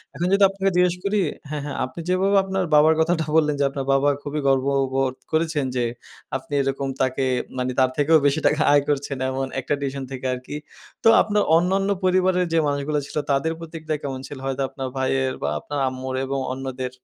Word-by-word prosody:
এখন 175 - -1
যদি 200 0 +4
আপনাকে 195 0 0
জিজ্ঞেস 180 0 +3
করি, 205 +1 +1 0.3
হ্যাঁ, 150 -1 -3
হ্যাঁ, 145 - -5
আপনি 130 +6 -10
যেভাবে 190 +2 +2
আপনার 190 0 -1
বাবার 155 +2 +6
কথাটা 160 -1 +1
বললেন 150 -2 +3
যে, - - +3
আপনার 135 -1 -4
বাবা 140 +1 +3
খুবই 150 +1 -3
গর্ববোধ 135 -1 +1 0.2
করেছেন 155 -3 0
যে, 125 - +1 0.5
আপনি 145 +3 -12
এরকম 135 0 -2
তাকে 130 +1 +1 0.3
মানে 125 0 -1
তার 130 - +4
থেকেও 155 +2 +5
বেশি 145 +2 +1
টাকা 150 - +1
আয় 145 - +6
করছেন 140 -1 -1
এমন 135 0 -2
একটা 140 - -2
ডিসশন 135 -1 -3
থেকে 130 0 -6
আরকি। 130 +3 -7 0.5
তো 225 - +7
আপনার 210 -1 +1
অন্যান্য 195 +3 +1
পরিবারের 185 0 +3
যে, - - +3
মানুষগুলা 145 +1 -1
ছিল, - - -7
তাদের 140 +4 +1
প্রতিক্রিয়া 160 -2 -4
কেমন 135 -2 -4
ছিল? 145 - -8
হয়তো 135 0 -2
আপনার 135 -2 -5
ভাইয়ের 130 0 0
বা 70 - +1
আপনার 145 - -5
আম্মুর 130 0 -5
এবং 135 0 -2
অন্যদের? 130 -1 -5
145 Hz, 190 wpm, -23 LUFS, 135-165 Hz, 0.5 s, তো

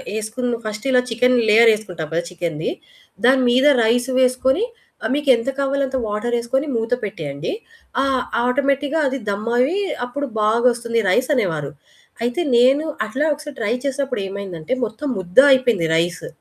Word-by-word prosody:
యేసుకున్న 235 +2 -3
first 215 +2 -5
ఇలా 250 -1 +4
chicken 250 +2 +3
layer 225 +1 +7
యేసుకుంటాం 180 -7 -6
గదా! 170 +1 0
చికెన్‌ది 170 -3 -3 0.5
దాని 260 +1 +5
మీద 260 +4 +4 0.2
రైస్ 245 +3 +1
వేసుకొని 260 - +2 0.5
మీకు 290 -1 -1
ఎంత 230 +3 -3
కావాలో 275 0 0
అంత 265 0 -3
వాటరేసుకొని 240 +6 -1
మూత 225 +1 -1
పెట్టేయండి. 155 -7 -5 0.5
ఆహ్, 270 -2 +1 0.2
ఆటోమేటిక్‌గా 280 +4 0
అది 270 +1 -2
దమ్ 210 +3 -4
అయ్యి 310 +12 +2 0.2
అప్పుడు 285 +4 -4
బాగొస్తుంది 235 +1 +1
రైస్ 250 +9 +2
అనేవారు. 160 - -1 0.5
అయితే 245 +8 -1 0.2
నేను 270 +6 +4 0.2
అట్లా 265 +8 -1
ఒకసారి 295 -1 -10
ట్రై 215 +1 0
చేసినప్పుడు 270 -4 -2
ఏమైందంటే 190 -3 -5
మొత్తం 220 +7 -6
ముద్ద 180 -1 -10
అయిపోయింది 240 -10 +3
రైసు. 170 +2 -1
240 Hz, 145 wpm, -20 LUFS, 210-265 Hz, 0.5 s, layer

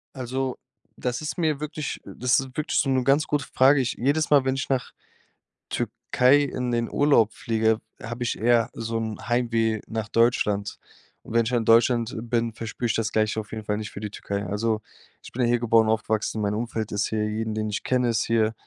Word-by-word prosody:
Also, 130 0 -3 0.4
das 125 +1 -3
ist 155 - -4
mir 155 -4 +1
wirklich 150 0 -4
das 125 0 +1
ist 135 -1 -7
wirklich 145 -2 0
so 135 - +1
'ne 130 -1 +2
ganz 140 +4 +3
gute 145 -2 -1
Frage. 135 +2 +5
Ich 125 - -1
jedes 145 +5 +1
Mal, 140 -3 +5
wenn 130 0 +1
ich 135 - -3
nach 130 -2 -1 0.8
Türkei 135 +4 +2
in 125 -3 -2
den 115 -1 0
Urlaub 140 -7 +3
fliege, 110 -1 +1 0.2
habe 120 +2 -5
ich 120 - -1
eher 115 0 +3
so 115 0 -3
'n 110 -1 -3
Heimweh 115 -3 +1
nach 110 -2 -4
Deutschland 105 -4 +1 0.5
und - - -9
wenn 115 0 +4
ich - - -1
dann 125 -1 +1
in 115 - -3
Deutschland 115 +1 +4
bin, 115 -1 0
verspüre 115 +2 -4
ich 115 - +1
das 115 -1 -1
Gleiche 110 0 +1
auf 110 - -8
jeden 110 -1 -5
Fall 105 0 -1
nicht 105 -1 -5
für 100 - -8
die 105 - -4
Türkei. 100 0 -4
Also, 110 +3 -1 0.4
ich - - -11
bin 125 - -3
ja 120 - +3
hier 120 0 +2
geboren, 115 -1 +4
aufgewachsen, 110 0 0
mein 100 0 0
Umfeld 110 -1 -3
ist 105 0 0
hier 105 -1 -1
jeden, 110 0 -3
den 110 0 -2
ich 105 - -3
kenne, 125 -1 +1
ist 115 -1 +1
hier. 110 -1 +2
115 Hz, 215 wpm, -25 LUFS, 110-130 Hz, 0.8 s, Frage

